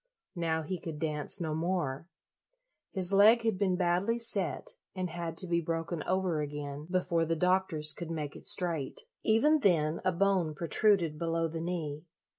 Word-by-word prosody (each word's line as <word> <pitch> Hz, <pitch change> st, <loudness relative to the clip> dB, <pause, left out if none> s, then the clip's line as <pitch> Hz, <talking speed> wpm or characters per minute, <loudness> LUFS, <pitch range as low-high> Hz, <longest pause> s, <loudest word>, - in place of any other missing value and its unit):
Now 160 Hz, -2 st, -1 dB
he 180 Hz, +3 st, -4 dB
could 160 Hz, -2 st, -6 dB
dance 150 Hz, -1 st, -2 dB
no 160 Hz, -3 st, -2 dB
more. 160 Hz, -3 st, -2 dB, 0.8 s
His 190 Hz, -1 st, +1 dB
leg 220 Hz, +4 st, +6 dB
had 220 Hz, -5 st, 0 dB
been 190 Hz, -3 st, +2 dB
badly 180 Hz, +5 st, +1 dB
set 220 Hz, -5 st, -1 dB, 0.2 s
and 185 Hz, -2 st, -3 dB
had 170 Hz, -1 st, -5 dB
to 185 Hz, -, +2 dB
be 170 Hz, 0 st, +1 dB
broken 165 Hz, 0 st, -3 dB
over 185 Hz, -4 st, +1 dB
again 145 Hz, 0 st, -5 dB
before 180 Hz, -2 st, +1 dB
the 165 Hz, 0 st, 0 dB
doctors 180 Hz, -3 st, +1 dB
could 170 Hz, -2 st, -7 dB
make 150 Hz, -3 st, -4 dB
it -, -, -4 dB
straight. 175 Hz, -9 st, 0 dB, 0.2 s
Even 295 Hz, +8 st, +4 dB
then 165 Hz, -, +2 dB
a 185 Hz, -, +2 dB
bone 180 Hz, -3 st, +1 dB
protruded 170 Hz, 0 st, +2 dB
below 165 Hz, 0 st, 0 dB
the 165 Hz, 0 st, -5 dB
knee. 160 Hz, -3 st, -4 dB
170 Hz, 165 wpm, -31 LUFS, 155-185 Hz, 0.8 s, leg